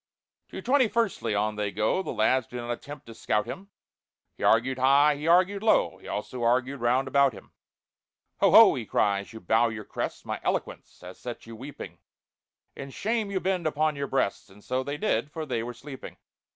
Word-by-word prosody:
To - - -8
"Twenty 260 0 +3
firstly" 205 - -1
on 105 +1 -1
they 105 -1 -1
go, 110 - 0
The - - -7
lads 120 +3 +1
do 125 - -8
not 120 0 -4
attempt 145 +5 -7
to 115 - -11
scout 105 -1 -1
him; 190 +11 -8 0.7
He - - -15
argued 130 +3 +3
high, 140 +3 +5
he 150 +3 -5
argued 185 +4 +3
low, 220 - +2
He - - -14
also 120 +4 -5
argued 125 +3 +1
round 125 +3 +2
about 140 -1 +3
him. 95 - -14 0.9
"Ho, - - +5
ho!" - - +8
he - - -4
cries, 100 -1 0
"you 110 - -9
bow 110 +5 +2
your 110 -2 -7
crests— - - -5
My - - -4
eloquence - - -4
has 90 +1 -11
set 120 -1 -7
you 115 0 -10
weeping; 120 - -9 0.8
In 140 - -7
shame 220 - -2
you 195 -1 -1
bend 185 -3 -1
upon 155 0 0
your 140 0 -3
breasts!" 110 -6 -1
(And 100 +2 -18
so 130 +1 -1
they 140 +2 -4
did, 155 -4 0
for 160 0 -5
they 125 -5 -2
were 120 +2 -5
sleeping.) 135 +2 -10
130 Hz, 200 wpm, -27 LUFS, 115-150 Hz, 0.9 s, ho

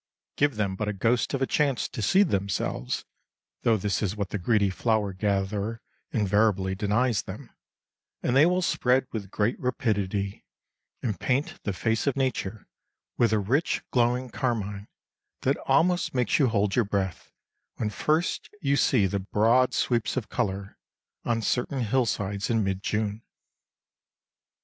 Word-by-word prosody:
Give 145 -3 +2
them 100 -3 -1
but 105 +2 -3
a 105 - -1
ghost 115 +6 +1
of 135 - 0
a - - +3
chance 140 -3 +1
to - - -5
seed 190 - +4
themselves 95 - -2 0.6
(though 115 -1 +3
this 100 0 -1
is 105 -2 -1
what 100 -3 -3
the 100 - -3
greedy 100 +1 +2
flower 105 -1 0
gatherer 100 +3 -1 0.3
invariably 100 -2 +2
denies 105 +2 +1
them), - - -9 0.7
and 120 - +1
they 145 +4 +7
will 180 +1 +1
spread 130 -4 +2
with 100 -4 -5
great 105 +4 0
rapidity, 100 -6 -1 0.6
and 105 -8 -2
paint 135 +3 -1
the 100 - 0
face 110 +7 -1
of 140 - +2
nature 120 -6 -2 0.5
with 115 -3 +4
a 110 - +3
rich 125 - 0
glowing 125 0 +1
carmine 105 -5 -2 0.6
that 135 +2 +2
almost 165 +4 +2
makes 125 +3 +2
you 135 - +5
hold 105 -3 +1
your 120 - +4
breath 95 -3 -3 0.4
when 105 -2 -2
first 155 +9 0
you 140 -5 +1
see 115 -8 +3
the 100 +1 -1
broad 115 +6 +3
sweeps 120 0 0
of 120 - -3
colour 100 0 -3 0.5
on 115 -1 0
certain 125 +4 0
hillsides 105 -4 0
in 115 -2 +2
mid 95 -1 -1
June. 105 +1 -2
110 Hz, 150 wpm, -27 LUFS, 100-125 Hz, 0.7 s, they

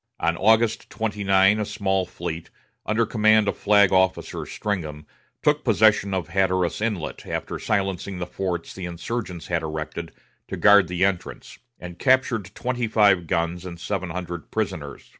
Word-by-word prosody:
On 85 +1 +1
August 110 +4 +2
29 100 -2 +2
a - - 0
small 95 -3 -1
fleet, 85 -2 -6 0.4
under 115 +2 +2
command 110 -1 +3
of 100 - 0
Flag 100 -2 +4
Officer 95 0 +1
Stringham, 80 -8 -4 0.4
took 150 0 +2
possession 110 -3 +3
of 90 -4 -3
Hatteras 95 -1 0
Inlet, 105 -8 -3
after - - -4
silencing 95 -2 -2
the 90 - -3
forts 90 -3 -4
the 95 - -6
insurgents 90 +1 -5
had 85 -2 -1
erected 80 +1 -5 0.4
to - - -5
guard 100 -3 +6
the 90 +2 +1
entrance, 95 -2 -4 0.2
and 90 -1 -9
captured 130 -6 +2
twenty 125 -2 -2
five 100 -6 +3
guns 85 +2 -1
and 85 -2 -8
seven 95 -1 -3
hundred 85 -1 -6
prisoners. - - -4
95 Hz, 150 wpm, -24 LUFS, 85-105 Hz, 0.4 s, guard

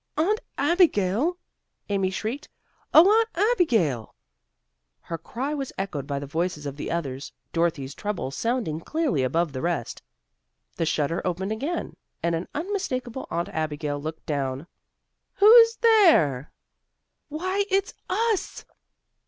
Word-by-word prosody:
"Aunt 400 +8 +2 0.2
Abigail!" 320 - +2 0.5
Amy 195 -2 0
shrieked, 225 +9 -4 0.4
"oh, 325 +4 +8
Aunt 445 +2 +4 0.2
Abigail!" 185 - +1 0.9
Her 165 - -6
cry 260 - -4
was 275 -3 -4
echoed 155 -8 -4
by 140 - -2
the 140 - -4
voices 160 +1 -2
of 140 -1 -4
the 145 - -5
others, 140 -5 -4 0.2
Dorothy's 155 -5 0
treble 205 -9 -4
sounding 220 - -1
clearly 305 - 0
above 155 +4 0
the 130 - -4
rest. 170 -9 -2 0.7
The 165 - -1
shutter 155 +2 0
opened 190 +3 -2
again, 285 +11 -3 0.3
and 170 0 +1
an 165 +2 -2
unmistakable 285 - -3
Aunt 170 +1 -2
Abigail 150 -2 -3
looked 155 +1 -6
down. 140 -1 -2 0.7
"Who's 455 +2 +8
there?" 335 - +4 0.8
"Why, 370 +6 -1
it's 390 +2 +1 0.2
us!" 435 +1 -1
190 Hz, 125 wpm, -25 LUFS, -, 0.9 s, oh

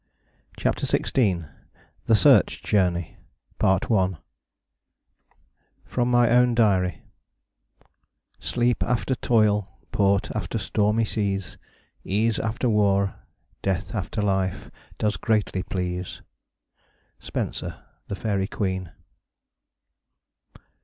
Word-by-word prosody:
CHAPTER - - 0
XVI 95 - +1 0.6
THE 115 - +5
SEARCH 100 - +4
JOURNEY 90 -5 0 0.4
From 95 -1 +2 1.9
my 120 -1 +4
own 125 0 +4
diary 95 -8 +2 1.4
Sleep 120 0 0
after 125 +2 0
toyle, 105 -5 +1
port 100 -1 +2
after - - -3
stormie 105 +2 +1
seas, 100 -3 -2 0.4
Ease 110 +3 +1
after 115 +3 -1
warre, 100 -3 +2 0.5
death 100 +1 -2
after 105 0 -2
life, 95 -2 -1 0.3
does 105 0 0
greatly 105 -4 0
please. 90 -1 -4 1.0
SPENSER, - - -5 0.3
_The 100 - -3
Faerie 100 -1 -1
Queen. 95 -4 -3
100 Hz, 85 wpm, -25 LUFS, 95-110 Hz, 1.9 s, THE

